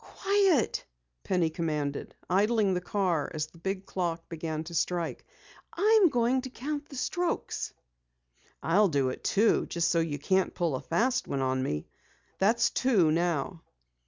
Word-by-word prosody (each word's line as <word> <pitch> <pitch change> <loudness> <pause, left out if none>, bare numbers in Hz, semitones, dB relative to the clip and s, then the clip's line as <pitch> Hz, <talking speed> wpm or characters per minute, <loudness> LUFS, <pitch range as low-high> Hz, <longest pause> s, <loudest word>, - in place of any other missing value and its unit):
"Quiet!" 390 - +1 0.4
Penny 175 -4 +1
commanded, 150 -4 -3
idling 205 +2 +2
the 180 - -1
car 180 -5 0
as 155 -1 -1
the 160 +2 -19
big 190 +2 -3
clock 170 -3 -3
began 160 -1 -4
to 170 +1 -9
strike. 170 0 -1 0.5
"I'm 415 0 +5
going 245 0 +2
to 260 - -7
count 290 +4 -5
the 275 - -10
strokes." 355 +6 -2 0.9
"I'll 200 +6 +4
do 140 -4 +1
it 130 - -7
too, 215 +2 +2
just 170 0 0
so 170 - +2
you 160 -3 -1
can't 190 +6 +1
pull 170 -4 0
a 130 - -2
fast 250 +9 0
one 135 - -2
on 130 0 0
me. 75 - -2 0.5
That's 230 +4 +3
two 205 -12 +3
now." 170 0 -1
180 Hz, 155 wpm, -29 LUFS, 160-235 Hz, 0.9 s, I'm